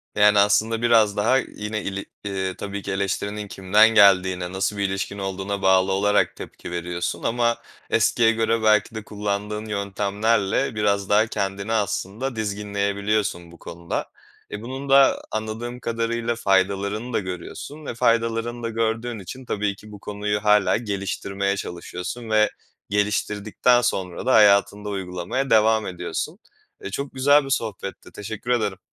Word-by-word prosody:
Yani, 105 0 +5
aslında 105 +3 +3
biraz 115 -3 +4
daha 115 +6 +3
yine 105 -4 -4
ili 100 0 -4 0.2
ııı, 95 -1 -2
tabii 100 0 -5
ki 100 - -5
eleştirinin 100 +2 -2
kimden 100 +4 +4
geldiğine, 95 -4 +4
nasıl 95 +2 -1
bir 100 - 0
ilişkin 95 +1 -3
olduğuna 95 0 -3
bağlı 95 0 +4
olarak 105 +2 +2
tepki - - -9
veriyorsun 85 0 -3
ama 120 0 +1 0.3
eskiye 115 -1 +3
göre 115 0 0
belki 110 +1 +3
de 110 - -5
kullandığın 105 0 -3
yöntemlerle 105 +3 0
biraz 100 -2 0
daha 105 +2 +4
kendini 100 0 -3
aslında 110 +4 -2
dizginleyebiliyorsun 100 -3 -1
bu 85 - -16
konuda. 85 0 -5 0.5
E, 105 - -5
bunun 130 +3 -6
da 135 0 +5
anladığım 110 +3 -4
kadarıyla 115 0 -1
faydalarını 100 +3 0
da - - +2
görüyorsun 105 +10 -7
ve - - -4
faydalarını 115 +1 0
da 115 - -1
gördüğün 115 +1 -2
için 125 +8 -9
tabii 105 -3 -1
ki 105 +2 -14
bu 105 - -10
konuyu 105 +1 -3
hâlâ 105 -1 +4
geliştirmeye 100 -2 -2
çalışıyorsun 90 +6 -6
ve 110 -1 +4 0.4
geliştirdikten 105 +3 +1
sonra 95 -7 -2
da 130 - +3
hayatında 105 -1 +4
uygulamaya 95 +7 -3
devam 110 0 +4
ediyorsun. 90 - -4 0.4
E, 415 - -5
çok 140 0 -5
güzel 140 +2 +4
bir 135 - -7
sohbetti. 110 -6 -4
Teşekkür 110 +3 -5
ederim. 105 -6 0
105 Hz, 145 wpm, -23 LUFS, 100-115 Hz, 0.5 s, Yani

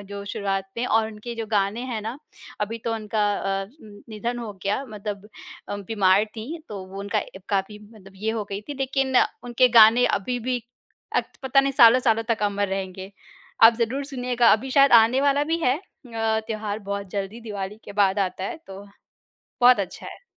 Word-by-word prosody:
जो 200 0 -8
शुरुआत 195 -1 -2
में 235 - -1
और 220 0 +2
उनके 220 +2 -8
जो 225 -1 -5
गाने 205 +2 0
हैं 220 - -3
ना 230 +6 -5 0.4
अभी 220 +2 -2
तो 230 - -1
उनका 215 -1 -3
अ, 195 0 -2 0.2
न 205 -1 -14
निधन 230 +3 -4
हो 225 -3 -6
गया 205 +8 -1
मतलब 210 -2 -7 0.4
अ, 205 - -3
बीमार 200 0 +2
थी, 230 +10 -8
तो 195 -3 -7
वो 195 +1 -10
उनका 205 +2 -1
अब 190 -1 -7
काफ़ी 200 +1 -1
मतलब 195 -3 -16
ये 215 +3 -2
हो 225 -2 -3
गई 200 0 -3
थी। 290 - -4
लेकिन 270 -1 0 0.3
उनके 245 +1 +3
गाने 225 +3 +7
अभी 245 +5 -3
भी 245 0 -2 0.5
अट - - +1 0.2
पता 265 +1 +4
नहीं 275 0 -1
सालों-सालों 230 -2 +5
तक 225 -2 0
अमर 205 -1 0
रहेंगे। 190 0 -5 0.5
आप 225 +1 +9
ज़रूर 250 +4 -1
सुनिएगा, 250 -3 +1
अभी 255 +5 0
शायद 275 0 +5
आने 235 +3 +6
वाला 285 +1 +2
भी 335 - +1
है 255 -4 +2
अ, 225 - -3
त्योहार 215 -2 -3
बहुत 200 -2 -5
जल्दी, 200 +4 -4
दिवाली 205 -2 -6
के - - -9
बाद 200 -1 +2
आता 185 -1 -2
है, 200 - -4
तो 195 +1 -10 0.8
बहुत 245 -2 +7
अच्छा 195 - -5
है। - - -11
220 Hz, 190 wpm, -24 LUFS, 200-245 Hz, 0.8 s, आप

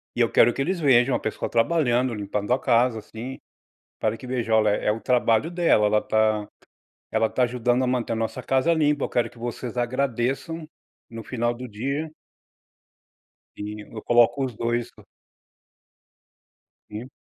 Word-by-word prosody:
E - - -5
eu - - +4
quero 120 0 +5
que - - -3
eles 175 +5 -1
vejam 130 -3 +4
a - - 0
pessoa 110 - -3
trabalhando, 125 -1 +2
limpando 105 +1 -3
a 130 - +1
casa, 120 -2 +2
assim, 115 +5 -8 0.6
para 110 0 0
que - - -11
veja: 120 -3 -2
"Olha, 110 -1 +4
é 105 +1 0
o 110 +1 -4
trabalho 125 +4 +2
dela, 170 -12 +3
ela 105 0 +2
tá, 110 -1 +1 0.6
ela 110 - +2
tá 130 - 0
ajudando 125 +1 +1
a - - 0
manter 125 -2 -1
a - - -3
nossa 115 +3 -3
casa 135 +5 +2
limpa. 150 -3 +2
Eu - - -2
quero 120 -1 +1
que 120 - -18
vocês 120 0 -5
agradeçam 130 +5 -1 0.4
no 115 -1 -7
final 120 0 -1
do 125 +1 -8
dia". 140 +9 -3 1.5
E 105 +1 -6
eu 110 - -6
coloco 120 +3 +4
os 125 - -6
2 120 +1 -2
pa - - -18 1.9
Sim. 115 +5 -7
120 Hz, 165 wpm, -24 LUFS, 110-130 Hz, 1.9 s, quero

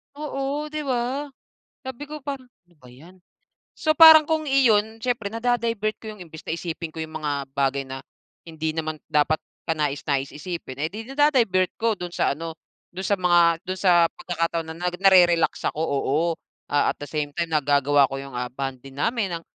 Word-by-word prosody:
Oo, 290 0 -3
'di 305 -1 -3
ba? 260 +3 -1 0.6
Sabi 260 +2 -6
ko 305 0 -6
pa 280 0 -4
"ano 245 -9 -21
ba 125 - -16
yan" 165 +9 -16 0.6
so, 310 - -1
parang 315 0 +10
kung 310 0 -1
iyon 225 -5 +2
siyempre 240 -4 -1
nada-divert 230 -2 -1
ko 215 -1 -8
yung 190 - -11
imbes 160 -2 -12
na 160 - -1
isipin 165 -1 -6
ko 160 - -4
yung 155 0 -6
mga 145 -2 -2
bagay 140 0 +1
na, 135 0 -7 0.5
hindi 160 -1 -3
naman 155 -1 -4
dapat 150 +1 +2 0.3
kanais-nais 145 -3 -1
isipin, 150 -5 -7
eh, 155 - 0
di 210 +7 -7
nada-divert 245 -11 +2
ko 225 -3 -1
dun 175 -1 -5
sa - - +1
ano, 165 -1 -6 0.4
dun 190 - -5
sa 200 +1 0
mga, 175 -2 +4
dun 185 - -2
sa 175 -3 +5
pagkakataon 165 -2 -2
na 160 - -7
narerelax 180 -1 +3
ako, 155 - -5
oo. 140 -1 0 0.5
Ah, 145 0 +2
at - - -44
the 145 - -6
same 145 -2 -3
time 170 -1 -2
nagagawa 145 -1 +3
ko, 135 - -8
ah, 135 - -6
yung 135 -2 -10 0.2
bonding 135 0 -6
namin, 185 - -1
175 Hz, 180 wpm, -24 LUFS, 150-230 Hz, 0.6 s, parang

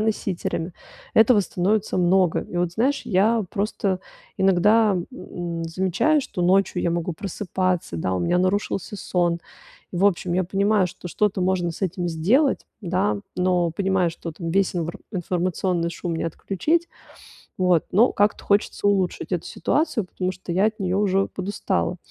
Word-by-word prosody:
носителями. 190 -5 -2 0.4
Этого 220 -1 +6
становится 195 +3 0
много. 180 -1 +3
И 175 - -8
вот 175 -1 0
знаешь, 260 +8 +1
я 215 +4 +3
просто 200 -2 -1 0.4
иногда, 200 +2 +4 0.2
м, 170 -8 -5
замечаю, 190 - +1
что 180 -8 -4
ночью 185 0 +2
я 170 - +1
могу 170 0 -1
просыпаться, 185 - -2
да, 95 +3 -1
у 90 - 0
меня 85 - +1
нарушился 195 +2 -1
сон. 175 -3 0 0.5
В 180 +3 +1
общем, 175 -2 0
я 185 - +2
понимаю, 200 +2 +2
что 175 0 -9
что-то 205 +1 0
можно 180 -2 +1
с - - -11
этим 180 -1 -1
сделать, 215 - +2 0.2
да, 175 - 0 0.2
но 180 -2 +2
понимаю, 190 -1 +1
что 165 0 -7
там 165 +1 -5
весь 195 +1 +1
инвр 170 0 -3
информационный 180 -1 -1
шум 170 -1 -4
не - - -2
отключить. 305 - -1 0.7
Вот, 180 -3 +3
но 225 +7 +4
как-то 205 +1 +2
хочется 205 0 +1
улучшить 190 -3 0
эту - - -2
ситуацию, 295 - 0
потому 185 0 -3
что 180 -1 -8
я 190 +4 +3
от 220 0 -5
неё 185 0 0
уже 195 -1 +2
подустала. 190 -2 -2
185 Hz, 155 wpm, -23 LUFS, 175-205 Hz, 0.7 s, Этого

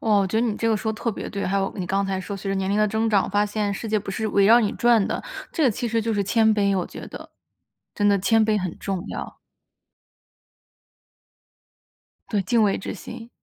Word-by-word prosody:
哦， 215 -2 +3
我 195 - +1
觉 220 +4 0
得 240 - +1
你 215 -3 -2
这 230 - 0
个 220 - +2
说 220 +1 -2
得 - - -9
特 230 - +1
别 210 - -6
对， 200 -1 -3
还 195 +2 0
有 195 0 -1
你 185 -3 -3
刚 195 +3 0
才 195 -1 -2
说 200 +2 -6
随 195 0 -5
着 - - 0
年 190 0 -1
龄 200 - +1
的 215 - +4
增 220 +2 0
长， 205 -3 +2
发 205 +1 +2
现 205 -1 -2
世 220 +3 -5
界 215 0 +2
不 200 -1 -7
是 220 +3 -2
围 200 -1 +3
绕 230 +3 +7
你 210 -3 0
转 235 -4 +3
的， - - -3 0.3
这 325 - -1
个 260 - +5
其 235 +3 -3
实 230 0 +1
就 225 0 -1
是 205 - +1
谦 220 +1 +3
卑， 200 -2 +2
我 180 - -1
觉 - - -9
得。 - - -10 0.6
真 205 0 +2
的 200 -1 +4
谦 225 +3 +3
卑 215 -1 +2
很 185 -4 -4
重 190 -2 -3
要。 - - -7 2.9
对， 210 - 0
敬 225 +4 +2
畏 200 -2 +2
之 - - -5
心。 230 +4 -9
205 Hz, 265 characters per minute, -23 LUFS, 195-220 Hz, 2.9 s, 绕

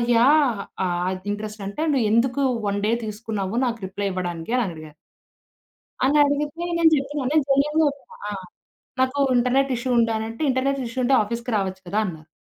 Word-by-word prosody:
Yeah! 255 -3 +4 0.2
ఆ - - +1 0.4
ఇంట్రెస్టంటే 210 +3 -5
"నువ్వెందుకు 245 +3 +2 0.2
1 200 0 0
day 230 - +2
తీసుకున్నావు 215 -1 -4
నాకు 235 -1 -2
రిప్లై 200 +1 -3
ఇవ్వడానికి" 175 +3 -4
అనడిగారు. 155 -4 -8 1.1
అనడిగితే 290 +2 +2 0.2
నేను 325 -1 +6
జెప్పినా. 280 0 -2
నేను 310 -2 +3
జెన్యూన్‌గా 300 +3 +3
ఒప్ 280 0 -13 0.3
ఆ! - - -3 0.7
నాకు 260 +2 +1 0.2
ఇంటర్నెట్ 260 +3 +2
ఇష్యూ 250 +2 -3
ఉండేనంటే 225 +2 0
"ఇంటర్నెట్ 270 +2 0
ఇష్యూ 230 +2 -4
ఉంటే 270 - +3
ఆఫీస్‌కి 235 +3 -4
రావచ్చు 190 -1 -2
కదా!" 205 +4 -1
అన్నారు. 160 -3 -8
235 Hz, 140 wpm, -23 LUFS, 205-275 Hz, 1.1 s, నేను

